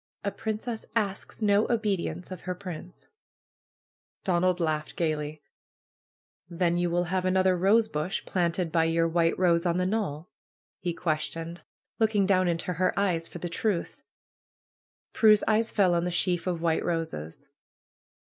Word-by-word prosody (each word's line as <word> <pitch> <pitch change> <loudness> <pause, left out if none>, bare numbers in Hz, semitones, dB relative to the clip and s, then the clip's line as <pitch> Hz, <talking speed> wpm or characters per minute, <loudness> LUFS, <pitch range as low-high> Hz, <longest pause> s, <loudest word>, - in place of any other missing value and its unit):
'^A 200 - -2
princess 220 +1 -4
asks 205 0 -2
no 205 +1 +3
obedience 195 -6 -1
of 185 - -7
her 180 - -1
prince 180 -1 -8
1" - - -31 1.1
Donald 180 -1 +2
laughed 155 -2 -1
gaily. 155 -2 -2 1.1
^^Then 170 0 +1
you 175 0 +1
will 175 +1 +1
have 180 +1 -1
another 185 0 +3
rosebush 190 -3 +1
planted 175 -1 0
by 165 0 +3
your 165 0 +2
white 165 0 +2
rose 170 -2 +3
on 175 -1 +1
the 180 - +1
knoll?" 185 -6 -2 0.5
he 175 - -2
questioned, 165 +1 -3 0.4
looking 215 -3 +3
down 185 -2 +3
into 170 +1 -1
her 185 +4 0
eyes 170 -5 0
for - - -9
the 175 - -4
truth. 180 +1 -2 1.1
Prue's 215 -2 +5
eyes 220 +1 +3
fell 190 -4 +3
on 170 0 +1
the - - 0
sheaf 175 0 0
of 170 -2 -2
white 165 -1 +1
roses. 160 - -4
180 Hz, 150 wpm, -28 LUFS, 165-195 Hz, 1.1 s, Prue's